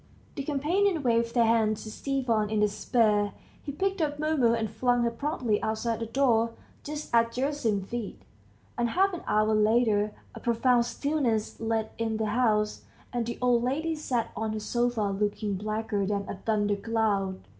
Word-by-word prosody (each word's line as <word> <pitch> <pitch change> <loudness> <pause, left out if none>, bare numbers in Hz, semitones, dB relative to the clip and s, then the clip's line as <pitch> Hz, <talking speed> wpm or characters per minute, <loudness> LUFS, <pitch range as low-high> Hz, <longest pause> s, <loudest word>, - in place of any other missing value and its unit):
The 280 - -4
companions 315 +5 +1
waved 230 -1 +1
their 235 -1 +5
hands 220 -2 +2
to 215 - -7
Stepan 235 -5 0
in 215 -1 0
despair. 210 0 +2 0.3
He 285 - -5
picked 385 +5 -1
up 295 -2 0
Mumu, 295 -6 +2
and 225 -1 -1
flung 245 +2 +1
her 235 - +1
promptly 245 -4 -1
outside 220 +1 -1
the 230 - -3
door, 230 -2 +2 0.3
just 300 -3 -6
at 230 0 +4
Gerasim's 245 -7 -1
feet, 235 -4 -5 0.6
and 235 0 +2
half 385 +7 +2
an 350 - -5
hour 215 +1 +2
later 215 -1 +3 0.2
a - - -8
profound 240 0 +2
stillness 245 -4 -1
led 225 -1 -1
in 225 -1 -1
the 220 - -1
house, 215 -4 +1 0.3
and 240 -2 -1
the 235 - -4
old 245 -1 +4
lady 300 +7 -1
sat 255 -7 -2
on 220 0 -2
her 215 - -3
sofa 240 +1 0 0.2
looking 205 0 -1
blacker 215 +1 -2
than 200 -1 -2
a - - -4
thundercloud. 205 -2 0
230 Hz, 165 wpm, -28 LUFS, 215-260 Hz, 0.6 s, their